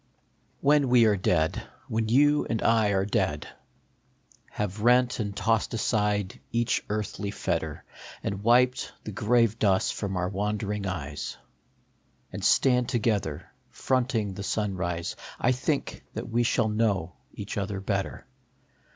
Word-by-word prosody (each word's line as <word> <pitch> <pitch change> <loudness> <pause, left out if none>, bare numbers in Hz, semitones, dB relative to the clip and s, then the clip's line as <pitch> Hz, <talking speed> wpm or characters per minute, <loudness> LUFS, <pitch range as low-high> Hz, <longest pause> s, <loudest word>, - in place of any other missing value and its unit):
JHEN 145 -1 +4
we 120 -2 +6
are 105 -2 +4
dead, 85 -4 +1 0.3
when 110 0 -1
you 145 +4 +4
and 115 -2 -1
I 115 -2 +4
are 95 -1 +1
dead, 100 - -1 1.0
Have 105 0 -4
rent 125 +2 +4
and 100 -2 -3
tossed 110 +1 +1
aside 105 -3 0
each 120 0 +1
earthly 105 -1 -3
fettei - - -2 0.4
And 100 0 -3
wiped 125 +3 +3
the 105 - -6
grave 115 +1 +2
dust 95 -3 +2
from 95 -3 -3
our 90 0 0
wonderinj 105 0 -2
eyes, 75 -6 -5 1.0
And - - -6
stand 125 -2 +3
together, 105 - -1 0.2
fronting 120 -6 0
the 100 - -7
sunrise, 95 -5 -2 0.2
I 125 - +3
think 135 +3 -2
that - - -4
we 120 +1 +1
shall 120 -1 +2
know 105 -6 0 0.2
each 100 0 -6
other 100 -1 -2
better. 100 0 -3
105 Hz, 135 wpm, -27 LUFS, 100-120 Hz, 1.0 s, we